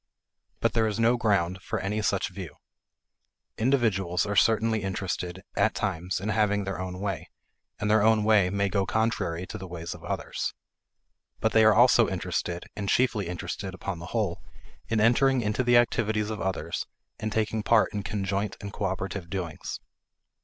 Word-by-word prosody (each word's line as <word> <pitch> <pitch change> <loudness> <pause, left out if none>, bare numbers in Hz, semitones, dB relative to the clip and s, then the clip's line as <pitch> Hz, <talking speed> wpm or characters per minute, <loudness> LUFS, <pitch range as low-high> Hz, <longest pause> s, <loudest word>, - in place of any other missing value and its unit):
But - - +2
there 110 -1 +2
is 105 0 -2
no 115 +2 +4
ground 95 -6 +1
for - - -3
any 105 +3 -1
such 105 - 0
view. - - -8 1.0
Individuals 110 -8 +2
are 100 0 -2
certainly 110 +2 +3
interested, 95 -2 -3
at - - +2
times, 90 +3 -2
in 100 +3 -3
having 105 -1 +2
their 95 -1 -4
own 90 0 -5
way, 100 -3 -3 0.5
and 105 - -2
their 105 0 +4
own 110 0 +4
way 105 -4 +4
may 100 +1 +1
go 100 -1 0
contrary 110 -6 0
to - - -7
the 95 - -7
ways 85 -1 -6
of - - -13
others. - - -3 0.8
But 110 - +1
they 110 0 +5
are 110 -1 +6
also - - +6
interested, 85 0 -3
and 100 -2 -3
chiefly 115 -7 +2
interested 95 +2 -5
upon 95 -2 -5
the 85 - -8
whole, 100 -5 -1 0.5
in 115 - +1
entering 125 +4 +4
into 105 +3 0
the 120 0 +5
activities 110 -2 +1
of 110 - -4
others 95 0 -2 0.3
and 110 - -3
taking 110 0 0
part 115 +1 +3
in 105 - -2
conjoint 100 0 -2
and 100 0 -7
cooperative 95 -2 -3
doings. 85 -4 -4
100 Hz, 170 wpm, -27 LUFS, 95-110 Hz, 1.0 s, are